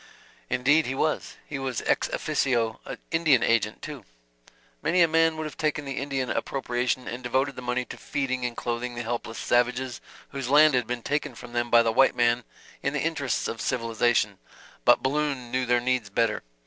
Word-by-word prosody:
"Indeed 135 +5 +3
he 130 - -2
was. 155 +3 -1
He 145 - -5
was 130 -4 -3
ex - - +2
officio 115 -4 0 0.3
Indian 160 -7 +4
agent, 110 -2 +1
too. - - -7 0.8
Many 170 +2 +4
a - - +5
man 165 0 +3
would 155 - -3
have 155 - -7
taken 150 -1 -1
the 135 -1 -3
Indian 135 -2 -2
appropriation 125 -1 -1
and 120 +2 -5
devoted 130 +3 0
the 125 - -7
money 125 0 -1
to - - -9
feeding 130 -3 -2
and 120 -1 -3
clothing 120 +1 -3
the 120 - -4
helpless 115 -1 -4
savages, 125 +1 0 0.3
whose 135 -3 -5
land 150 +1 +7
had 125 -1 +1
been 120 -1 -3
taken 145 -3 -2
from 120 +1 -11
them 120 0 0
by 120 0 +6
the 115 - +2
white 135 +3 +4
man 120 0 +2 0.4
in 140 - -1
the 150 - 0
interests 145 -6 -1
of 115 - -5
civilization; 115 -4 +1 0.5
but - - +5
Balloon 135 -3 -1
knew 130 0 0
their 120 0 +4
needs 125 -3 0
better. 110 +2 +1
125 Hz, 185 wpm, -26 LUFS, 120-140 Hz, 0.8 s, land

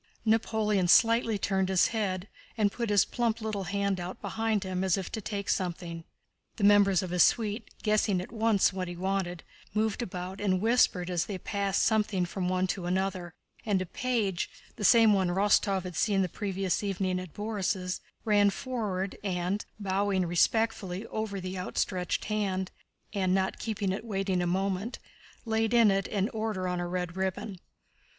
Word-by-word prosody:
Napoleon 215 -3 +2
slightly 230 +3 +5
turned 190 -1 0
his 190 -2 +4
head, 200 -4 -2 0.3
and 210 -2 +2
put 235 0 -3
his 205 -2 +4
plump 230 -2 -1
little 215 -3 -3
hand 200 0 -1
out 175 +1 -6
behind 220 -2 -1
him 185 -1 -2
as 190 0 +2
if 190 - -5
to 220 - -4
take 200 -1 -4
something. 170 -2 -2 0.5
The 210 - -4
members 200 -2 +5
of 180 - -5
his 180 -1 +3
suite, 215 +2 +2
guessing 210 -3 +2
at 180 - -7
once 220 -4 +2
what 185 -1 -3
he 175 - -6
wanted, 185 -1 -2 0.3
moved 220 +1 0
about 185 -2 -5
and 190 -3 +2
whispered 200 -5 +2
as 175 -2 0
they 200 - -4
passed 200 +1 0
something 210 -4 +2
from 180 +1 -3
one 185 0 +1
to 185 -1 -3
another, 185 -2 -2 0.3
and 205 -3 +1
a 185 - -2
page—the 210 -2 -3
same 225 0 +6
one 190 -2 +2
Rostóv 195 +1 +2
had 180 -2 -7
seen 195 +1 +2
the - - 0
previous 195 -1 -2
evening 190 -2 -1
at 185 -3 -9
Borís'—ran 205 0 0
forward 200 -5 -3
and, 185 +1 -1 0.2
bowing 195 -1 0
respectfully 195 +2 +1
over 215 -2 -3
the 185 0 -5
outstretched 180 0 -2
hand 195 -3 -1 0.4
and 185 -2 +1
not 190 0 0
keeping 205 -4 -2
it 195 - -3
waiting 195 -4 -1
a 175 - 0
moment, 195 +5 -1 0.5
laid 225 +1 +1
in 230 -3 +6
it 195 0 0
an 200 -1 0
Order 215 -5 -2
on 180 -1 -1
a 175 - -2
red 180 -1 -3
ribbon. 190 +1 -3
195 Hz, 170 wpm, -29 LUFS, 185-215 Hz, 0.5 s, same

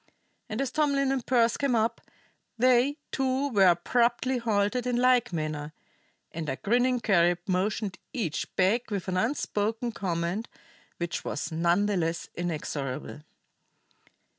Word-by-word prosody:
And 215 - -3
as 270 -2 -2
Tomlin 280 -2 +1
and 265 -2 -1
Pearse 235 -2 +2
came 275 -4 +1
up, 230 +1 0 0.6
they, 255 +4 +3
too, 265 +1 0
were 200 -6 +5
abruptly 240 +8 +2
halted 230 +2 0
in 245 - +1
like 250 -2 +3
manner; 155 -2 -3 0.6
and 160 -2 -4
a 135 - -1
grinning 245 - +1
Carib 175 -6 +3
motioned 195 +1 -1
each 215 - -2
back 200 +6 +2
with 200 -4 -3
an 185 -1 -1
unspoken 225 0 -1
command 180 +2 -2 0.5
which 170 0 -3
was 145 - -4
none 170 +5 +2
the 205 -2 0
less 165 0 -2
inexorable. 150 -5 -4
215 Hz, 135 wpm, -28 LUFS, 175-250 Hz, 0.6 s, were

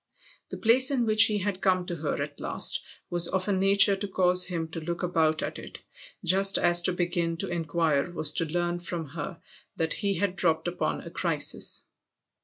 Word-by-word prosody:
The - - -7
place 255 +3 +4
in 260 -4 0
which 215 -1 +6
he 215 -2 0
had 195 -1 -3
come 185 -1 +1
to 175 - -4
her 150 -2 -3
at 145 0 -9
last - - +1 0.3
was 175 -1 +4
of 190 0 -2
a 205 - +1
nature 195 +1 +4
to 205 +1 -5
cause 180 -1 +2
him 170 -3 -4
to 165 - -6
look 170 +2 -5
about 160 -3 0
at - - -5
it, - - -10 0.5
just 195 +3 +3
as 175 0 +3
to 180 - +2
begin 175 -1 -2
to - - -3
inquire 165 -2 -1
was 155 -3 +1
to 165 - 0
learn 175 +2 -2
from 170 -3 -5
her 165 +3 -7 0.4
that 160 -1 -1
he 200 -2 -2
had 185 +1 -1
dropped 160 -3 0
upon 175 - -3
a 170 - -10
crisis. 170 -4 0
175 Hz, 200 wpm, -27 LUFS, 165-195 Hz, 0.5 s, which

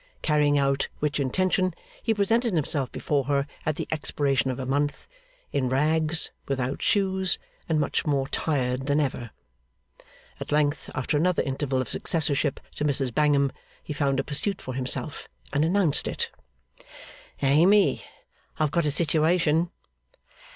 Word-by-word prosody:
Carrying 150 -2 +3
out 140 0 +1
which 150 0 -1
intention, 185 +6 +1 0.3
he 230 - 0
presented 225 +1 +1
himself 145 -3 +1
before 140 -3 -1
her 140 0 +1 0.2
at 155 - +1
the - - -4
expiration 140 -4 0
of 130 - -2
a 130 - -3
month, 145 +2 -1 0.4
in 130 -3 0
rags, 155 +4 +2 0.2
without 130 -1 -2
shoes, 190 -2 +1 0.3
and 160 -2 +2
much 145 - 0
more 140 -3 0
tired 130 -3 -1
than 145 +1 +2
ever. 125 -5 -2 1.1
At - - -6
length, 150 0 +1
after 130 +3 0
another 180 +3 +2
interval 135 -1 -1
of 130 - -4
successorship 150 -4 +1 0.2
to - - -1
Mrs 135 -4 0
Bangham, 140 -1 +3 0.3
he - - -5
found 140 -2 0
a - - +1
pursuit 155 +9 -1
for 130 - -6
himself, 130 0 -2 0.3
and 145 - +2
announced 170 -2 +2
it. - - -2 1.1
'Amy, 175 +9 +4 0.5
I - - +1
have 150 - +1
got 170 0 +1
a - - +3
situation. 160 +2 +2
145 Hz, 145 wpm, -26 LUFS, 135-160 Hz, 1.1 s, Amy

